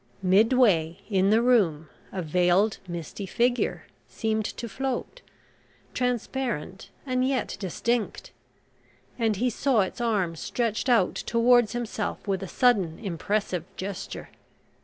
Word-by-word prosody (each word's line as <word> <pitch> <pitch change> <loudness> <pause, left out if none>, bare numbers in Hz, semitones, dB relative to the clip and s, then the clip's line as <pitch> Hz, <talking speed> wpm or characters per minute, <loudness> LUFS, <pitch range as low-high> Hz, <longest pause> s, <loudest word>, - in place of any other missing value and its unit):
Midway 190 -4 +4
in 195 0 +3
the 225 +2 +4
room 180 -11 +3 0.2
a 185 -2 -3
veiled 180 +6 +2
misty 175 +3 -6
figure 245 +5 0 0.2
seemed 220 -1 -1
to 235 - -5
float 270 - -4 0.7
transparent 245 - -2 0.2
and 255 -1 0
yet 260 -3 -1
distinct 215 +4 -2 0.9
and 225 -2 +2
he 245 +5 0
saw 245 -1 +2
its 190 +5 -3
arm 200 -8 0
stretched 230 +7 -2
out 230 -7 +4
towards 240 -1 +3
himself 225 -3 -4
with 195 -1 0
a 195 - -5
sudden 195 -8 +2
impressive 195 -2 -2
gesture. 195 0 -6
215 Hz, 115 wpm, -26 LUFS, 185-245 Hz, 0.9 s, Midway